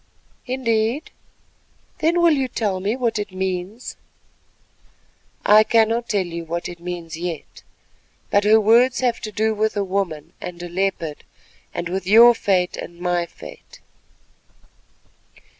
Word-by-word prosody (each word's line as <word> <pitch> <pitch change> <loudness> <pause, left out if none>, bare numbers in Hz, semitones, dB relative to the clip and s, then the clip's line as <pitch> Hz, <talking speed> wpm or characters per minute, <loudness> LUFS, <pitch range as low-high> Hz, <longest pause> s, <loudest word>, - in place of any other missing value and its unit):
"Indeed? 240 +2 -1 0.9
Then 340 +2 +2
will 340 - +6
you 270 -3 0
tell 205 -6 -2
me 200 +5 -1
what 235 -4 -1
it 205 - -4
means?" 190 +4 -4 1.5
"I 210 +1 +7
cannot 230 +1 +2
tell 200 -4 +1
you 170 -1 -6
what 170 +1 -4
it 175 -1 -9
means 170 -1 -6
yet, 170 -2 -6 0.7
but 205 - +3
her 215 +2 +6
words 235 +5 +4
have 245 -2 +1
to 215 - -5
do 220 +1 0
with 215 0 -1
a 200 - +1
woman 185 -6 -3
and 175 -1 -7
a 175 - -6
leopard, 175 -4 -2 0.5
and 170 - -4
with 185 +1 -4
your 230 +4 +8
fate 185 -5 0
and 175 0 -8
my 175 -1 0
fate." - - -13
205 Hz, 140 wpm, -21 LUFS, 180-230 Hz, 1.5 s, your